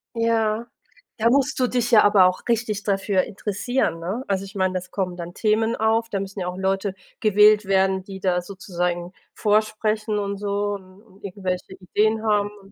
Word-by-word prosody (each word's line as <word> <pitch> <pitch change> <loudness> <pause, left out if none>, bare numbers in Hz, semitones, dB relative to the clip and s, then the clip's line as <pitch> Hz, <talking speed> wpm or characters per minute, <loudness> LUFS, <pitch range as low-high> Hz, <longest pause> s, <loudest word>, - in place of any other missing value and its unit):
Ja, 230 0 +1 0.5
da 225 +1 +2
musst 275 +2 +2
du 250 - +3
dich 245 -1 -1
ja 215 - +7
aber 200 -3 +6
auch 185 0 +1
richtig 220 -3 0
dafür 195 -1 +1
interessieren, 205 -2 -2
ne? 195 +10 -4
Also, 195 -1 -1
ich 195 - -13
meine, 185 -1 0
es 185 - -13
kommen 185 -3 -3
dann 175 0 -7
Themen 220 +1 +1
auf, 225 +1 +1
da 195 - -2
müssen 195 +1 -6
ja 180 - -3
auch 180 +1 -5
Leute 195 0 -1 0.2
gewählt 210 0 +5
werden, 190 -1 +2
die 195 0 -9
da 180 -1 +1
sozusagen 180 -2 -3 0.2
vorsprechen 215 0 0
und 200 -1 -2
so 205 0 -1
und 190 0 -11
und 200 -3 -22
irgendwelche 190 -1 -4
Ideen 215 +4 0
haben 205 -1 +2
und 195 +1 -18
200 Hz, 185 wpm, -23 LUFS, 190-215 Hz, 0.5 s, ja